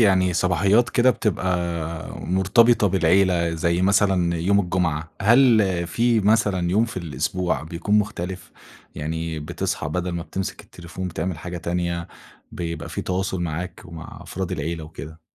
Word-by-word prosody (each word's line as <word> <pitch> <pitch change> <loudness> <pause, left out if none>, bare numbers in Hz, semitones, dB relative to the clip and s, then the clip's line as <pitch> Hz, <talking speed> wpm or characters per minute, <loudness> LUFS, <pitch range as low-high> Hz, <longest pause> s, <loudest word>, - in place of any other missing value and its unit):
يعني 95 -4 +4
صباحيات 100 +7 +3
كده، 125 +1 +4
بتبقى 105 -6 -1 0.7
مرتبطة 100 +5 +3
بالعيلة 90 -1 +3
زي 85 +2 0
مثلًا 95 -3 +3
يوم 100 +5 +2
الجمعة. 85 -4 -1
هل 110 -7 +4
في 115 +3 +2
مثلًا 100 -4 +2
يوم 110 +5 +3
في 115 - -8
الأسبوع 85 +2 -2
بيكون 85 +6 0
مختلف، 95 -3 -4 0.4
يعني 80 +1 -3
بتصحى 75 -1 -3
بدل 90 +3 -2
ما 85 -1 -3
بتمسك 95 +2 -5
التليفون 90 +2 -7
بتعمل 85 0 -3
حاجة 90 +1 -6
تانية، 85 0 -2 0.4
بيبقى 85 -2 -5
في - - -4
تواصل 95 0 -2
معاك 85 +2 -4
ومع 85 -3 -10
أفراد 95 -1 -4
العيلة 80 0 -3
وكده؟ 80 +1 -10
90 Hz, 135 wpm, -23 LUFS, 85-100 Hz, 0.7 s, يعني